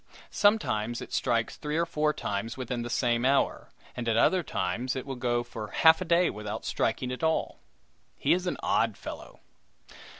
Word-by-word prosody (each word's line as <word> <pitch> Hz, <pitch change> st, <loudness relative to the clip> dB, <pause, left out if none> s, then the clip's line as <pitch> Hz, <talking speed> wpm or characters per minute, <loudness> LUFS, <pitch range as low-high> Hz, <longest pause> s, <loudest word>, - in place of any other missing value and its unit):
Sometimes 120 Hz, -, +2 dB
it -, -, -9 dB
strikes 115 Hz, -3 st, 0 dB
three 150 Hz, +1 st, -3 dB
or 170 Hz, -, +2 dB
four 150 Hz, -2 st, +1 dB
times 110 Hz, -3 st, -4 dB
within 125 Hz, -1 st, -3 dB
the 120 Hz, -, -5 dB
same 120 Hz, -1 st, +1 dB
hour, 135 Hz, +2 st, +1 dB, 0.3 s
and 120 Hz, -1 st, -2 dB
at 115 Hz, -, +2 dB
other 185 Hz, +9 st, +4 dB
times 115 Hz, -, -2 dB
it 130 Hz, -, -4 dB
will 135 Hz, -, -4 dB
go 120 Hz, -1 st, 0 dB
for 115 Hz, -3 st, -7 dB
half 160 Hz, -, +5 dB
a -, -, -2 dB
day 170 Hz, +1 st, +4 dB
without 105 Hz, +1 st, -6 dB
striking 125 Hz, +3 st, -1 dB
at 125 Hz, -, -5 dB
all. 160 Hz, 0 st, 0 dB, 0.6 s
He -, -, +3 dB
is 180 Hz, +1 st, -1 dB
an -, -, -1 dB
odd -, -, +2 dB
old -, -, -21 dB
fellow! -, -, -9 dB
125 Hz, 190 wpm, -28 LUFS, 115-160 Hz, 0.6 s, half